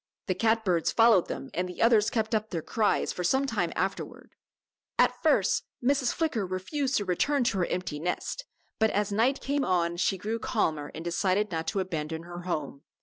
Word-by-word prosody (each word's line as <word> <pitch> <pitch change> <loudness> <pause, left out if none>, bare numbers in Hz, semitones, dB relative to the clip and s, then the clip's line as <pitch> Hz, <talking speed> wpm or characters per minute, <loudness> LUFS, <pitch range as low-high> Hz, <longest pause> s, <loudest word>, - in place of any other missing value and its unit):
The 185 - 0
cat 220 +3 +1
birds 175 -4 +2
followed 225 -6 +5
them 135 - -6
and 180 +1 -2
the 180 - -9
others 225 -2 +4
kept 220 -1 -1
up 215 0 0
their 165 -4 -3
cries 215 -2 +1
for 180 - -4
some 265 +10 +2
time 205 -10 -1
afterward. 190 +3 -3 0.7
At - - +3
first - - +2 0.2
Mrs. 265 -1 +2
Flicker 300 -10 -1
refused 225 - -2
to 205 - -1
return 265 +10 +1
to 225 -5 0
her 175 - +1
empty 180 -5 -3
nest, 180 - -3 0.3
but 220 0 +4
as 205 0 0
night 235 +7 +2
came 280 +1 0
on 175 -3 +1
she 190 +2 +1
grew 220 +5 -3
calmer 155 -12 -1
and 165 - -7
decided 185 +4 +1
not 160 -1 -3
to 200 - -1
abandon 160 -3 -4
her 175 0 -8
home. 155 -6 -4
195 Hz, 195 wpm, -28 LUFS, 175-230 Hz, 0.7 s, followed